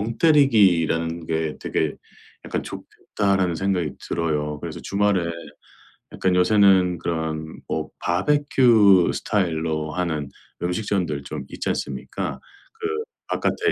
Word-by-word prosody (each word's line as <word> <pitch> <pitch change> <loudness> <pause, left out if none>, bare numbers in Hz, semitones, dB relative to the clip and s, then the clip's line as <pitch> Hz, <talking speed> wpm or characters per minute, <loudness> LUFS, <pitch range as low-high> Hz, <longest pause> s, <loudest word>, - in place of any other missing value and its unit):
멍때리기라는 100 - +3
게 80 -1 -2
되게 80 -2 -1 0.5
약간 - - -3
좋겠다.'라는 95 -4 -1
생각이 90 -3 -1 0.2
들어요. 75 -3 -1
그래서 - - -6
주말에 100 -4 +1 0.8
약간 95 -1 +1
요새는 95 -2 +4
그런 80 -1 -3
뭐 80 -1 -3
바베큐 110 -3 +4
스타일로 80 -5 -1
하는 80 -5 -2 0.3
음식점들 90 -5 -1
좀 - - -6
있지 - - -4
않습니까. 70 -2 -4 0.4
그 430 - -2 0.4
바깥에 430 0 0
90 Hz, 265 characters per minute, -23 LUFS, 80-100 Hz, 0.8 s, 요새는